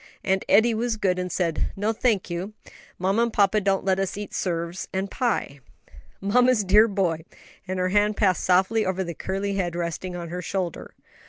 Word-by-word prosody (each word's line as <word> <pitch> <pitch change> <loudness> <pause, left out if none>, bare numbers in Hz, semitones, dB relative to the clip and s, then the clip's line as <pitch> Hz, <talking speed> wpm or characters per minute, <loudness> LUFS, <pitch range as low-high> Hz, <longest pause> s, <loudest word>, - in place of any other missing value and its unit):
"And 190 0 +1
Eddie 225 +3 +5
was 225 0 -1
good, 185 -3 +1
and 180 0 -3
said, 170 -3 -1
'No, 210 +3 0
thank 220 -4 +1
you; 180 +4 -4 0.4
mamma 195 +5 +1
and 235 0 +1
papa 210 0 +3
don't 195 -1 0
let 190 -1 +2
us 195 0 -2
eat 205 0 -6
'serves 170 0 -3
and 190 0 -3
pie.'" 220 - -1 0.6
"Mamma's 245 +3 +3
dear 210 +4 +6
boy," 180 -6 -1 0.4
and 185 0 -3
her 185 0 0
hand 205 +1 +2
passed 190 -4 +2
softly 190 +5 +3
over 190 0 -1
the 170 -1 -5
curly 195 +4 -3
head 175 -3 -1
resting 175 +1 -4
on 170 -1 -6
her 180 +1 -4
shoulder. 180 -1 -4
190 Hz, 185 wpm, -25 LUFS, 180-210 Hz, 0.6 s, dear